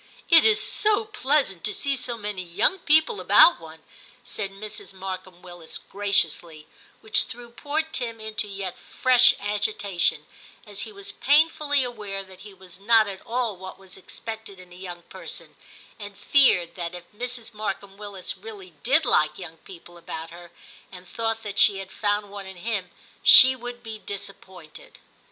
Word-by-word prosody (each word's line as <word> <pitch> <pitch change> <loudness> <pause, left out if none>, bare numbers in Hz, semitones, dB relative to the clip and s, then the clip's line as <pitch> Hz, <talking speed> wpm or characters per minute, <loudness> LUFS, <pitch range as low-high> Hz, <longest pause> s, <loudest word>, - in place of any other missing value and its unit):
* - - -25
It 330 -1 +9
is 435 -1 +5
so 425 +1 +1
pleasant 285 - 0
to 210 - -2
see 280 -1 -1
so 245 -2 -5
many 205 -3 -4
young 190 - +1
people 315 +9 +3
about 345 - +7
one,' 160 -1 -13 0.4
said 215 -4 -4
Mrs. 195 0 -8
Markham 185 -1 -7
Willis 175 -2 -9
graciously, 175 -6 -2 0.4
which 220 - +2
threw 240 0 -10
poor 295 +6 -1
Tim 245 -8 -4
into 215 -1 -4
yet 195 -2 -5
fresh 250 -1 +4
agitation, 200 -6 -1 0.4
as 205 -2 -5
he 220 - -6
was 200 -1 -8
painfully 295 0 +3
aware 210 -5 -5
that 190 -1 -15
he 210 - -11
was 185 -2 -13
not 220 +1 +4
at 195 -1 -7
all 235 -3 -1
what 185 +1 -9
was 190 -1 -11
expected 220 0 -8
in 180 -1 -14
a - - -13
young 175 -2 -9
person, - - -9 0.4
and 205 -1 -9
feared 205 -7 +4
that 175 -1 -5
if 175 - -8
Mrs. 245 0 -4
Markham 200 -2 -5
Willis 200 -3 -7
really 195 -2 -11
did 280 +5 +3
like 155 -10 +2
young 165 -3 -9
people 175 0 -14
about 165 -1 -7
her, 175 0 -12 0.4
and 180 -1 -12
thought 225 +1 -2
that 205 -1 -4
she 200 - +6
had 190 -1 -8
found 205 -1 -1
one 200 -1 -8
in 190 -1 -10
him, 200 -1 -3 0.3
she 260 +1 +9
would 245 -1 -8
be 220 -2 -7
disappointed. 185 -5 -9
205 Hz, 170 wpm, -25 LUFS, 185-240 Hz, 0.4 s, It